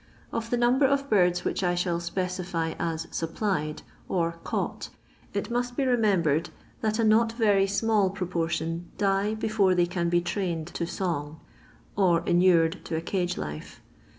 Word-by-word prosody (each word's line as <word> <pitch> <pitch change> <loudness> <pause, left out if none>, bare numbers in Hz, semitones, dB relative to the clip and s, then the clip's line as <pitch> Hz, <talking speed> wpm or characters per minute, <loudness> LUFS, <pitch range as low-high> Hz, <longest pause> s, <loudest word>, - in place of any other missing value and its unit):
Of 230 0 -3
the 245 - +1
number 250 +3 +4
of 280 0 0
birds 180 -3 +3
which - - -1
I 175 -1 +2
shall 175 -1 0
specify 175 -1 -2
as 165 -1 -2
"supplied," 165 -2 -2 0.3
or 170 -2 -1
" - - -25
caught," - - -3 0.4
it - - -3
must 245 0 -2
be 275 - +1
remembered 180 - +2 0.3
that 215 -1 0
a 230 - +1
not 225 +1 +4
very 205 -4 +3
small 205 0 +2
proportion 170 -3 -2
die 200 +1 +1
before 215 -4 +2
they 175 -1 +4
can 175 -1 -1
be 175 0 +3
trained 175 -2 -2
to 170 - -2
song, 160 -5 -3 0.6
or 175 -4 +3
inured 175 -1 +3
to 160 - -3
a 160 - -1
cage 180 0 -1
life. 75 0 -6
180 Hz, 160 wpm, -27 LUFS, 170-215 Hz, 0.6 s, number